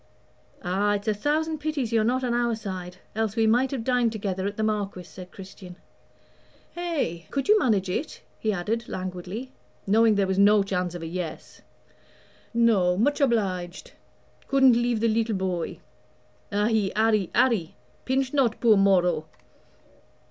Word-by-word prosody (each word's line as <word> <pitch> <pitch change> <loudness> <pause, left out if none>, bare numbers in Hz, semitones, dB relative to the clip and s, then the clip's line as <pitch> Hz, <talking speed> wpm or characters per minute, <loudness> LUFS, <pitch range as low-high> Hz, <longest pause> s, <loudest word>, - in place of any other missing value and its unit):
"Ah! 200 +3 +1
it's 205 +2 -6
a 215 - +3
thousand 310 +8 -1
pities 290 -6 -2
you're 225 -1 +3
not 255 +3 0
on 245 -1 0
our 240 -1 +1
side, 185 -4 -7 0.2
else 220 -1 -1
we 225 -1 +2
might 245 +4 +3
have 255 -4 -4
dined 245 -2 +1
together 195 -3 -3
at 205 - -5
the 220 - -1
Marquis," 205 -4 -2
said 180 +1 -12
Christian. 185 -1 -11 1.0
"Eh, 300 - -3
could 275 -1 -2
you 425 +1 +5
manage 210 - +1
it?" 190 +12 -4 0.2
he 220 - 0
added, 215 +5 -3
languidly, 185 +7 -6 0.3
knowing 220 +2 +4
there 200 -1 +2
was 190 0 -1
no 205 0 +5
chance 180 -3 -2
of 170 - -6
a - - -4
yes. 170 0 -6 0.9
"No 215 -7 +3
much 290 +8 +1
obliged 190 -8 -1 0.6
couldn't 265 -2 +5
leave 240 -1 +1
the 230 - +3
leetle 225 0 0
boy. 185 -3 -3 0.7
Ahi! 210 -1 +1
Arry, 215 -4 +2
Arry, 220 -11 +2 0.3
pinch 265 +1 -1
not 255 -6 +1
poor 225 -3 +5
Moro." 180 -5 +2
215 Hz, 155 wpm, -25 LUFS, 185-240 Hz, 1.0 s, you